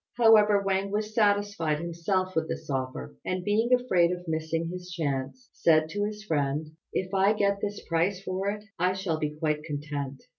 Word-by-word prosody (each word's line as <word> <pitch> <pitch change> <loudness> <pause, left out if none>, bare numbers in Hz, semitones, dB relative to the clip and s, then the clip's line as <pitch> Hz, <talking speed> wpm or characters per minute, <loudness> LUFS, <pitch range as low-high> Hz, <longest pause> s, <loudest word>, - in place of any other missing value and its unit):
However, 215 -3 +6
Wang 195 0 0
was 210 +1 -2
satisfied 205 -7 +2
himself 170 +3 -1
with 160 0 0
this - - -5
offer, 130 - -3
and 185 0 -2
being 220 +5 +1
afraid 190 -9 +4
of 180 0 -5
missing 160 +1 -1
his 180 0 -7
chance, 155 - -3
said 155 -1 +3
to 205 +5 -1
his 210 0 -5
friend, 150 -3 -1 0.2
"If 185 +1 -2
I 195 +2 +4
get 200 -1 +1
this 205 0 -4
price 175 +3 +1
for 190 +1 -2
it 210 0 -4 0.2
I 180 +2 +2
shall 190 -4 -2
be 150 -1 -2
quite 150 -1 -1
content. 145 -2 -5
180 Hz, 180 wpm, -28 LUFS, 155-205 Hz, 0.2 s, However